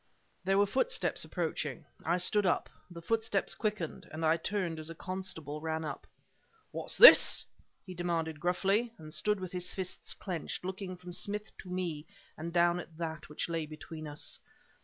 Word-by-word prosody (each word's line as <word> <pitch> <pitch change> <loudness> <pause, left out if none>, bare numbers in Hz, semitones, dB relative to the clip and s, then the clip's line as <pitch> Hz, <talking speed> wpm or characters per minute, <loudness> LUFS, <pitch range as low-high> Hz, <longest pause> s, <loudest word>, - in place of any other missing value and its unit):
There 195 +1 +2
were 200 - +5
footsteps 265 - +1
approaching. - - -3 0.2
I 170 +2 +2
stood 205 +3 +2
up. - - +1 0.2
The 170 -1 -10
footsteps 220 0 0
quickened; 210 -7 -3
and 160 +1 -3
I 160 +1 +5
turned 170 -1 -2
as 155 +1 -3
a 165 - -7
constable 160 -5 -5
ran 160 0 -2
up. 145 - -6 0.6
"What's - - -1
this?" - - +10 0.4
he 185 - -7
demanded 165 -3 -2
gruffly, 195 +7 +1
and 155 -1 -9
stood 210 +5 +1
with 185 -2 -6
his 180 0 0
fists 185 -2 -2
clenched, 180 -1 -5
looking 185 -1 -5
from 180 0 -10
Smith 210 +3 -2
to 185 - -10
me 170 -4 -3 0.3
and 165 +2 -5
down 175 0 +3
at 165 -2 -10
that 160 -3 -5
which 150 - -3
lay 165 -2 -2
between 155 +1 -8
us. 145 0 -3
175 Hz, 170 wpm, -32 LUFS, 160-190 Hz, 0.6 s, this